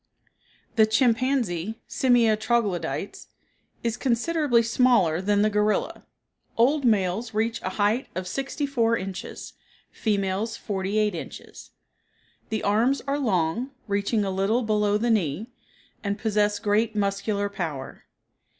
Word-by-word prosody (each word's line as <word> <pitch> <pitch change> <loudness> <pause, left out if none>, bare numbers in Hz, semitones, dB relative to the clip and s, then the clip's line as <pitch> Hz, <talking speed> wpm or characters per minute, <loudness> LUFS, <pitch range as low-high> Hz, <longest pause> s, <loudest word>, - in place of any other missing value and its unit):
The 220 -1 +6
chimpanzee 225 -5 +1
(Simia 240 -4 +3
troglodytes) 205 -6 -2 0.6
is 230 0 -1
considerably 255 0 +2
smaller 230 -8 +3
than 205 +1 +2
the 215 - +3
gorilla; 210 0 0 0.5
old 270 +5 +3
males 210 0 +1
reach 225 +1 0
a - - -2
height 215 +5 +1
of 185 0 -3
sixty 275 - -3
four 230 -5 +1
inches; 190 -1 -7 0.4
females, 205 +1 -1
forty 195 0 -3
eight 210 -2 +2
inches. 165 - -9 0.8
The 220 -1 -2
arms 230 +7 +2
are 280 +1 -1
long, 210 - 0 0.2
reaching 200 +1 0
a 195 - -1
little 195 +6 +1
below 210 -1 +2
the 235 +2 +1
knee, 200 - -1 0.5
and 200 -1 -1
possess 210 -1 +1
great 215 +2 +1
muscular 200 0 0
power. 160 -9 -6
215 Hz, 125 wpm, -25 LUFS, 200-235 Hz, 0.8 s, The